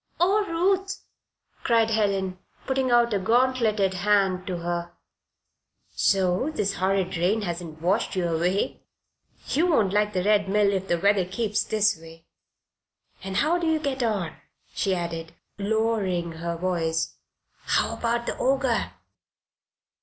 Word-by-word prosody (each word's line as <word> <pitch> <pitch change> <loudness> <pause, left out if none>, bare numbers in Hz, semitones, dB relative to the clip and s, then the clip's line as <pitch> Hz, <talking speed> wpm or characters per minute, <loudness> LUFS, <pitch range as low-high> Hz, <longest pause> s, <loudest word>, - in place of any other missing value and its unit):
"Oh, 390 +5 +3
Ruth!" 385 +3 0 0.6
cried 230 -2 +3
Helen, 195 -4 0 0.3
putting 265 -1 0
out 240 -1 +4
a 200 - +1
gauntleted 225 -3 +2
hand 190 -1 +1
to 180 -2 -2
her. 170 0 -3 1.0
"So 190 +7 +1
this 205 -10 -1
horrid 190 0 0
rain 200 +6 +1
has 175 -2 -3
not 160 -2 -10
washed 190 +7 0
you 180 -2 0
away? 175 +4 -1 0.7
You 330 +5 +2
won't 215 - +2
like 210 0 +1
the 185 - 0
Red 205 -1 +2
Mill 205 0 +3
if 190 0 -2
the 175 - +1
weather 200 +2 +3
keeps 210 +2 -1
this 215 -1 +2
way. 165 0 -14 1.0
And 190 0 -5
how 335 +4 +2
do 340 - -1
you 320 0 +3
get 280 -3 -2
on?" 205 -9 -1 0.4
she 195 -2 0
added, 165 -2 -5 0.3
lowering 200 -5 0
her 170 +1 -4
voice. 165 -2 -1 0.5
"How - - +1
about 235 0 -1
the - - -2
Ogre?" 265 -2 +1
200 Hz, 140 wpm, -25 LUFS, 180-235 Hz, 1.0 s, out